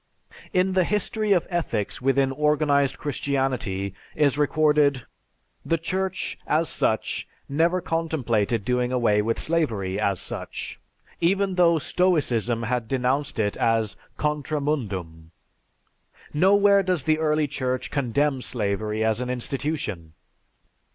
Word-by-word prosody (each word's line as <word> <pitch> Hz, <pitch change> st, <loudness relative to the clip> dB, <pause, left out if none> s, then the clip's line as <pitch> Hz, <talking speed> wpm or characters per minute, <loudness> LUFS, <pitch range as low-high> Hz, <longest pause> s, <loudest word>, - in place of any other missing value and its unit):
_) -, -, -17 dB, 0.2 s
In 185 Hz, +1 st, +2 dB
the 185 Hz, -1 st, +3 dB
"History 210 Hz, +2 st, -1 dB
of 180 Hz, -4 st, +3 dB
Ethics 125 Hz, -, -2 dB
Within 135 Hz, +1 st, +2 dB
Organized 145 Hz, -1 st, +2 dB
Christianity" 130 Hz, -9 st, -2 dB, 0.2 s
is 145 Hz, -3 st, +3 dB
recorded, 150 Hz, -2 st, +2 dB, 0.6 s
"The 165 Hz, -, +1 dB
Church, 190 Hz, +3 st, -3 dB
as 160 Hz, +1 st, +1 dB
such, 110 Hz, -, -1 dB, 0.2 s
never 165 Hz, +6 st, +1 dB
contemplated 120 Hz, -11 st, -1 dB
doing 125 Hz, 0 st, 0 dB
away 115 Hz, -5 st, +2 dB
with 115 Hz, +2 st, -1 dB
slavery 110 Hz, -, 0 dB
as 100 Hz, -4 st, +1 dB
such, -, -, -6 dB, 0.4 s
even 190 Hz, +3 st, +2 dB
though 170 Hz, -2 st, +4 dB
Stoicism 130 Hz, -, +1 dB
had 120 Hz, -1 st, -1 dB
denounced 135 Hz, +3 st, -1 dB
it 105 Hz, -2 st, 0 dB
as 115 Hz, -2 st, +1 dB, 0.2 s
'Contra 150 Hz, 0 st, -1 dB
Mundum.' 95 Hz, -, -3 dB, 1.0 s
Nowhere 200 Hz, +5 st, +5 dB
does 180 Hz, -6 st, 0 dB
the 155 Hz, +2 st, +2 dB
early 155 Hz, -1 st, +2 dB
Church 130 Hz, -3 st, -3 dB
condemn 140 Hz, +1 st, 0 dB
slavery 105 Hz, -2 st, -2 dB
as 110 Hz, +2 st, +1 dB
an 125 Hz, -, -3 dB
institution. 125 Hz, -, -3 dB
140 Hz, 120 wpm, -24 LUFS, 115-160 Hz, 1.0 s, Nowhere